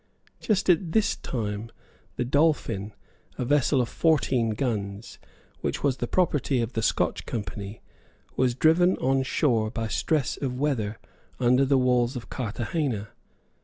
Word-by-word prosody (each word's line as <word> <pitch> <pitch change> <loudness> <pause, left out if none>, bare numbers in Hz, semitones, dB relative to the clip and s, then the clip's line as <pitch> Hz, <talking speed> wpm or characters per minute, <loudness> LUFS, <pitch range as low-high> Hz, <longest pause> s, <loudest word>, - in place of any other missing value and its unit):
Just 210 -3 0
at 170 -2 +2
this 215 -2 +2
time, 105 -2 -4 0.5
the 125 - -1
Dolphin, 120 -8 +1 0.4
a 125 - -2
vessel 140 0 +3
of 120 - -1
fourteen 130 -6 +2
guns, 105 -3 -3 0.4
which - - -3
was 135 -3 +2
the 120 - -2
property 145 -6 +1
of 115 +1 -2
the 115 - -1
Scotch 110 - 0
Company, 105 -2 -5 0.5
was 125 -2 +1
driven 170 +6 +4
on 135 +1 +1
shore 120 -5 +1
by 115 0 -3
stress 145 +5 0
of 125 -3 -3
weather 115 -8 -1 0.4
under 125 +2 +4
the 135 0 +3
walls 125 0 +2
of 120 - -7
Carthagena. 115 -1 -2
125 Hz, 140 wpm, -26 LUFS, 115-145 Hz, 0.5 s, driven